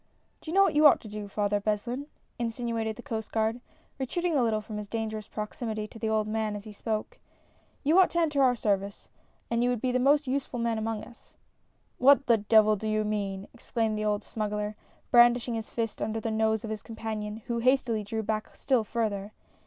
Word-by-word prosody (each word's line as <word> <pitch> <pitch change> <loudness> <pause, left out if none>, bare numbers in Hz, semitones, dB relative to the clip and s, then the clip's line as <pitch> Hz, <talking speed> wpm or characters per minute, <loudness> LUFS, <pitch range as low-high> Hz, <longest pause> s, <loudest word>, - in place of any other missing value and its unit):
"Do - - -9
you 335 - -2
know 395 - +7
what - - +2
you 300 +1 +7
ought - - +5
to - - -10
do. 210 -1 -6
Father 205 0 0
Beslin?" 235 +7 -2 0.3
insinuated 230 -1 -2
the - - -11
Coast 220 -6 -4
Guard, 225 +2 0 0.4
retreating 340 +6 -1
a 275 - +3
little 225 -2 +2
from 215 0 -7
his 210 -1 -5
dangerous 220 -1 -4
proximity 215 0 -4
to 225 - -12
the 220 - -1
old 215 -1 +1
man 215 -1 -1
as 205 - -6
he 215 - -9
spoke: 215 +1 -4 0.6
"You 315 +6 +5
ought 370 - +6
to 340 - 0
enter 300 -4 +2
our 255 -2 +5
service, 200 -3 -2 0.4
and 235 0 +2
you 245 - +2
would 245 -2 0
be 255 +3 0
the 255 - +1
most 285 +3 +4
useful 265 -1 -2
man 230 -1 0
among 220 -1 -3
us 240 - -16 0.2
" - - -43
" - - -43
What 275 +1 +6
the 235 -2 +5
devil 215 0 +5
do 215 +2 -5
you 215 0 +1
mean! 200 -2 -3
" - - -40
exclaimed 225 -2 -1
the 215 0 -2
old 210 0 0
smuggler, 210 -1 -3 0.4
brandishing 240 0 +5
his 225 -1 -4
fist 225 -2 -3
under 220 0 -1
the 225 0 -3
nose 220 0 +1
of 220 - -4
his 215 -1 -4
companion, 220 -1 -5
who 235 -1 -2
hastily 240 -3 +2
drew 220 +2 -3
back 215 0 -3
still 255 -5 +1
further. 210 -2 -2
220 Hz, 220 wpm, -28 LUFS, 215-245 Hz, 0.6 s, know